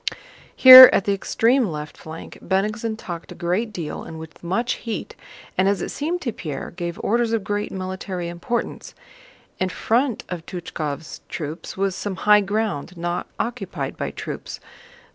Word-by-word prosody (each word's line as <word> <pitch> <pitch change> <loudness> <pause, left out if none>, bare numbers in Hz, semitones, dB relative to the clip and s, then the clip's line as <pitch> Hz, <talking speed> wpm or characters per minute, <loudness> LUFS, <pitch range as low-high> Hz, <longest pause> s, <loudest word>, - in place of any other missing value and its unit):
Here, 255 0 +12
at 195 - +1
the 200 - +2
extreme 230 +5 +2
left 150 -2 -6
flank, 160 +1 -10
Bennigsen 215 +3 -1
talked 175 -6 -7
a - - -8
great 185 +7 -1
deal 170 -6 -5
and 160 - -9
with 160 +1 -11
much 235 +8 0
heat, 230 -2 -5 0.4
and, 190 - +4
as 200 - +1
it - - -4
seemed 335 +5 -2
to 240 -5 -3
Pierre, 150 -8 -6
gave 170 -1 -5
orders 235 +1 +1
of 225 -3 0
great 205 0 -2
military 185 -1 -5
importance. 175 +8 -4 0.6
In 185 - 0
front 240 +6 0
of 175 -3 -6
Túchkov's 160 -4 -5
troops 160 +3 -6
was 195 -1 0
some 200 0 -4
high 210 0 +7
ground 200 -5 -2
not 175 +1 -3
occupied 230 -5 -4
by - - -3
troops. - - -7
195 Hz, 160 wpm, -22 LUFS, 170-225 Hz, 0.6 s, Here